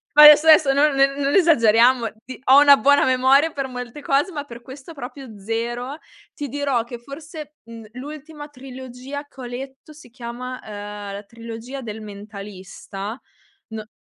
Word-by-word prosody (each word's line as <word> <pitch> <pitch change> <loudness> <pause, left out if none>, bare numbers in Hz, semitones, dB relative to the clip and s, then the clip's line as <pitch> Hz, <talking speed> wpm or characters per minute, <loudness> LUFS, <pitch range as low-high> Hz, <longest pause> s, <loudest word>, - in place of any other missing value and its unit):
Adesso, 300 +1 +9
adesso 305 -3 +6
non 290 +1 +3
ne 275 0 +3
non 280 0 0
esageriamo, 240 - +4 0.2
ti 260 - -9
ho 265 +2 +7
una 285 -1 +8
buona 285 +5 +4
memoria 260 +4 +3
per 275 -2 -4
molte 250 +2 -8
cose, 280 +6 +1
ma 295 -4 -5
per 235 -3 -11
questo 265 +6 -11
proprio 265 -5 -9
zero. 240 +6 -4 0.4
Ti 290 - -5
dirò 275 -3 -1
che 240 +1 -9
forse, 300 +3 -10
mhmm, 230 -1 -11
l'ultima 295 +3 -9
trilogia 260 0 -9
che 270 - -14
ho - - -6
letto 265 +4 -9
si 300 -4 -16
chiama, 250 +1 -7
uhm, 205 -1 -8
la 200 +1 -7
trilogia 230 +4 -9
del 220 -2 -7
mentalista? 200 +1 -9 0.5
No 220 -1 -7
260 Hz, 160 wpm, -21 LUFS, 230-285 Hz, 0.5 s, Adesso